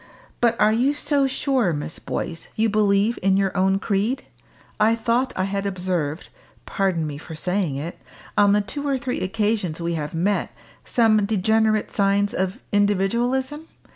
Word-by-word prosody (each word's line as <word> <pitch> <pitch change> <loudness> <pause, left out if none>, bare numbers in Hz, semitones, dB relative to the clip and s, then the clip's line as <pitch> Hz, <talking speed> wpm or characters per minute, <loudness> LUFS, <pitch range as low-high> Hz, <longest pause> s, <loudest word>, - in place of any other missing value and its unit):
But 235 -1 +2
are 210 +1 +4
you 260 +6 +2
so 285 -1 +2
sure, 260 - +1
Miss 150 +2 -5
Boyce, 165 -1 -5
you 220 +1 +2
believe 210 +1 +2
in 190 0 +3
your 195 -1 0
own 190 0 +3
creed? 210 +5 -1 0.6
I 220 +2 +4
thought 235 +3 0
I 185 - 0
had 195 +1 -2
observed 180 -5 -2 0.4
pardon 185 -5 0
me 145 -1 -5
for 160 - -9
saying 180 -2 -1
it 155 +5 -6 0.4
on 205 -1 +5
the 210 - +3
two 285 +8 -4
or 275 -1 +1
three 255 -1 -3
occasions 205 -4 -1
we 170 0 -2
have 150 -1 -4
met, 195 +5 0 0.3
some 220 -3 +3
degenerate 220 +1 +1
signs 200 0 +1
of 190 0 -1
individualism? 235 - +1
205 Hz, 160 wpm, -23 LUFS, 185-230 Hz, 0.6 s, on